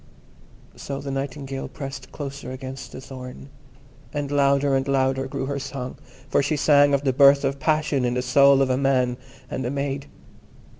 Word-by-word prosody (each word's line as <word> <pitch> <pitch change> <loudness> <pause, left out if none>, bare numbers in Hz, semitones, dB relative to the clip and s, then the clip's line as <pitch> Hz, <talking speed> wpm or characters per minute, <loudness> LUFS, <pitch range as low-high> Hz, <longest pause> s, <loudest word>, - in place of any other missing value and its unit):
So 140 -1 -5
the 140 - -5
Nightingale 135 0 -4
pressed 135 -2 -8
closer 140 -3 -6
against 130 +1 -7
the - - -8
thorn, 125 - -9 0.6
and 145 -1 -3
louder 140 0 +3
and 135 +1 0
louder 135 -1 +1
grew 135 0 -3
her 140 +1 -3
song, 130 -2 -6 0.3
for 135 - +2
she 150 +2 0
sang 145 -1 +5
of 140 - -2
the 135 -2 +1
birth 140 +1 +6
of 135 0 -1
passion 155 -3 +1
in 120 0 0
the 125 - -1
soul 140 +1 +5
of 130 - 0
a 130 - +2
man 130 -2 +1 0.3
and 130 - -4
a 120 - -1
maid. 140 0 -3
135 Hz, 180 wpm, -24 LUFS, 130-140 Hz, 0.6 s, birth